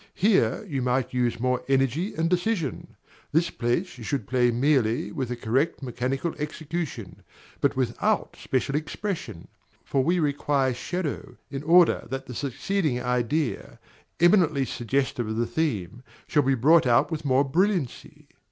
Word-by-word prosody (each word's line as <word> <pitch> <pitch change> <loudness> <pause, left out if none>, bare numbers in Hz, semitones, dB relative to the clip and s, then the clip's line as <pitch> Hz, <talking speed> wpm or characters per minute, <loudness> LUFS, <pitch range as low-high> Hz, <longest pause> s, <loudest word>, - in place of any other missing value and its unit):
Here 210 +2 +2
you 140 -6 -2
might 125 0 0
use 120 -2 0
more 125 +1 0
energy 135 - +1
and 160 +1 +1
decision. 180 - -1 0.4
This 165 +3 +2
place 125 +5 -2
you - - -8
should 125 -1 -2
play 125 0 +2
merely 125 +1 +1
with 135 -6 -3
a 125 - -2
correct 130 +7 0
mechanical 130 +6 -2
execution, 150 - -5 0.4
but - - +1
without 125 -3 0
special 130 +1 -2
expression; 155 - -4 0.4
for 135 - +1
we 175 +5 +2
require 145 -3 +1
shadow, 160 +4 -4
in 135 -1 -4
order 170 +3 +4
that 135 0 -4
the 125 - -8
succeeding 145 - -1
idea, 125 +3 -1 0.4
eminently 170 -6 +4
suggestive 125 -1 -1
of 110 0 -3
the 120 - +1
theme, 120 - -2 0.2
shall 150 - +2
be 135 -1 +2
brought 150 +4 +5
out 120 +7 +3
with 160 -1 -3
more 135 -1 +3
brilliancy. 170 - -1
135 Hz, 145 wpm, -26 LUFS, 125-160 Hz, 0.4 s, brought